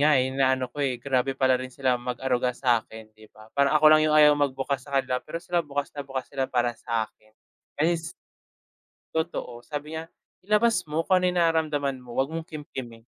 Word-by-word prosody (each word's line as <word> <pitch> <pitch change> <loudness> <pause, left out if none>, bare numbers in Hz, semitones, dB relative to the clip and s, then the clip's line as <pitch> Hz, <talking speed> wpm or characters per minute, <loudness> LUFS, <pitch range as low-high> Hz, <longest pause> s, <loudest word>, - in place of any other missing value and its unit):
nga, 150 0 +5
eh. 130 0 +2
Inaano 130 -1 +1
ko, 145 - -6
eh, 135 -3 0
grabe 135 +1 0
pala 130 -1 +3
rin 130 - -5
sila 130 -2 0
mag-aruga 125 0 -1
sa'kin, 110 -3 -1
di 110 0 -18
ba? 110 +1 -18
Parang 140 +2 +3
ako 155 - +1
lang 155 - +6
yung 150 - +3
ayaw 150 -1 +8
magbukas 140 -1 -1
sa 140 - -1
kanila, 130 -1 -2
pero 160 - -7
sila 175 0 0
bukas 145 -3 -4
na 145 - -6
bukas 135 -1 -4
sila 135 -1 -2
para 120 -1 +1
sa'kin. 110 -2 -4 0.5
Ayun, 170 +2 +3
s 165 - -7 1.0
Totoo. 125 -7 -3
Sabi 150 +2 -5
niya, 160 - -5 0.4
ilabas 215 +3 +2
mo 155 +2 -1
kung 185 +1 +3
ano 180 - 0
yung - - -2
nararamdaman 150 -5 +1
mo, 125 -1 -12
'wag 135 +4 0
mong 165 0 -5
kimkimin. 130 -7 -8
135 Hz, 200 wpm, -26 LUFS, 125-155 Hz, 1.0 s, ayaw